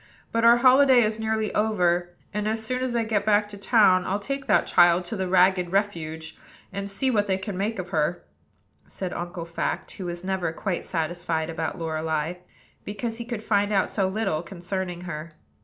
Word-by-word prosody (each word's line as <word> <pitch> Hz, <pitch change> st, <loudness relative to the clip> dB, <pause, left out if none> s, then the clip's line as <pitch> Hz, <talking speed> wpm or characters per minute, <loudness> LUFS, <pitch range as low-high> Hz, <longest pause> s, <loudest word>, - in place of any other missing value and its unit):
But 230 Hz, 0 st, 0 dB
our 235 Hz, +1 st, +7 dB
holiday 260 Hz, 0 st, +6 dB
is 215 Hz, +1 st, -1 dB
nearly 220 Hz, -1 st, -1 dB
over; 180 Hz, -5 st, +1 dB, 0.2 s
and, 210 Hz, 0 st, -1 dB
as 220 Hz, 0 st, -2 dB
soon 255 Hz, +2 st, -2 dB
as 255 Hz, -2 st, -2 dB
I 230 Hz, -, +2 dB
get 220 Hz, -2 st, 0 dB
back 205 Hz, 0 st, +3 dB
to 205 Hz, -, -8 dB
town, 200 Hz, -3 st, +4 dB
I'll 195 Hz, -, 0 dB
take 275 Hz, +6 st, -5 dB
that 210 Hz, -, +4 dB
child 175 Hz, +1 st, +4 dB
to 195 Hz, -, -4 dB
the 190 Hz, -2 st, -2 dB
Ragged 180 Hz, -1 st, +3 dB
Refuge, 165 Hz, -5 st, -2 dB, 0.3 s
and 200 Hz, 0 st, -4 dB
see 260 Hz, +7 st, 0 dB
what 210 Hz, -3 st, +1 dB
they 190 Hz, -1 st, +1 dB
can 195 Hz, 0 st, -5 dB
make 205 Hz, +4 st, -2 dB
of 185 Hz, -1 st, -5 dB
her," 160 Hz, 0 st, 0 dB, 0.6 s
said 185 Hz, -2 st, -5 dB
Uncle 175 Hz, -1 st, -5 dB
Fact, 170 Hz, 0 st, -3 dB
who 185 Hz, -3 st, -6 dB
was 175 Hz, 0 st, -5 dB
never 185 Hz, -3 st, -1 dB
quite 185 Hz, 0 st, -3 dB
satisfied 165 Hz, -1 st, -2 dB
about 165 Hz, +3 st, -3 dB
Lorelei; 160 Hz, 0 st, -2 dB, 0.5 s
because 225 Hz, +3 st, -4 dB
he 235 Hz, -, -5 dB
could 235 Hz, -3 st, -5 dB
find 205 Hz, -1 st, +1 dB
out 195 Hz, -2 st, +1 dB
so 195 Hz, -3 st, +1 dB
little 195 Hz, -5 st, -1 dB
concerning 180 Hz, 0 st, -5 dB
her. 165 Hz, -2 st, -7 dB
195 Hz, 190 wpm, -25 LUFS, 175-220 Hz, 0.6 s, our